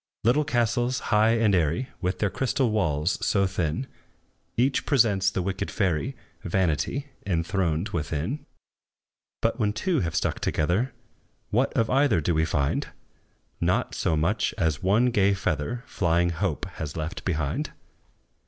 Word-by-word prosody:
Little 140 +7 +3
castles, 120 -1 +1 0.2
high 110 +2 +5
and 110 -3 +3
airy, 90 - +1
With 90 0 -1
their 105 -3 0
crystal 130 - 0
walls 85 -5 0
so 100 -1 +3
thin, 95 - -1 0.7
Each 130 +3 +2
presents 105 -9 +3
the 95 -1 -2
wicked 95 +1 -2
fairy, 100 - 0 0.3
Vanity, 95 - 0
enthroned 85 0 0
within! 85 - -3 1.0
But - - +1
when 105 -1 +1
two 160 - 0
have 85 -6 -2
struck - - 0
together, 95 +12 0 0.6
What - - +2
of 115 - +2
either 135 - +4
do 85 +3 0
we 80 0 +2
find? 70 -3 0 0.7
Not - - +1
so 80 - 0
much 85 +9 +1
as 80 -2 0
one 110 +7 +3
gay 100 -3 +3
feather 95 - -2
Flying 85 - +1
Hope 85 0 -2
has 75 0 -5
left 80 +3 -4
behind! 75 -6 -1
95 Hz, 140 wpm, -26 LUFS, 80-115 Hz, 1.0 s, high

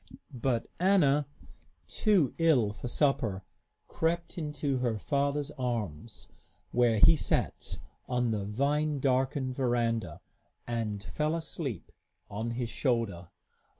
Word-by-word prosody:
But 120 -1 0
Anna, 150 -7 +4 0.6
too 190 - +2
ill 135 -11 +3
for 125 - -6
supper, 120 -8 +1 0.4
crept 170 +1 -1
into 150 -4 -2
her 120 -3 0
father's 140 +4 0
arms, 115 -6 -3 0.4
where 120 -2 +3
he 135 - +7
sat - - -1 0.3
on 125 -2 +1
the 105 -2 -1
vine 140 +8 0
darkened 130 0 +1
veranda, 115 - 0 0.5
and 110 -4 -3
fell 150 +7 -1
asleep 160 - -5 0.4
on 110 +3 -3
his 125 -2 -1
shoulder. 115 - -1
125 Hz, 110 wpm, -30 LUFS, 115-150 Hz, 0.6 s, he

